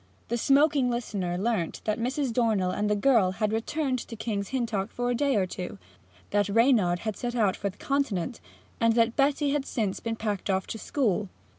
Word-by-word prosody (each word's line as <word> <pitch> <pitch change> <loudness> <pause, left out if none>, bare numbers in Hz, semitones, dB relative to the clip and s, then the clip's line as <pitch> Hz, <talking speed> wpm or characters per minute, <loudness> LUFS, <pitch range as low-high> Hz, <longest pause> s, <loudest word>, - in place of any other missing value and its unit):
The 235 - 0
smoking 280 0 +4
listener 200 -7 -2
learnt 200 -4 -1
that 215 +1 -1
Mrs. 255 +1 -1
Dornell 220 -6 +2
and 210 +2 -1
the 210 - +3
girl 210 -5 +3
had 215 +2 -1
returned 260 +3 -1
to 230 - -8
King's 205 -3 -3
Hintock 230 -6 -1
for 245 0 -2
a - - +1
day 275 +1 +1
or 195 -3 +2
two, 180 - -6 0.5
that 205 0 +2
Reynard 210 -6 +3
had 215 -2 -3
set 245 0 -4
out 210 -5 +2
for 200 - -2
the 190 - -13
Continent, 255 -6 -1 0.4
and 230 -1 +4
that 230 0 +3
Betty 285 +1 +2
had 290 -1 0
since 210 -7 -2
been 230 -1 -3
packed 210 -3 -3
off 190 -1 +1
to 225 - -6
school. 215 -8 0
225 Hz, 195 wpm, -27 LUFS, 200-250 Hz, 0.5 s, smoking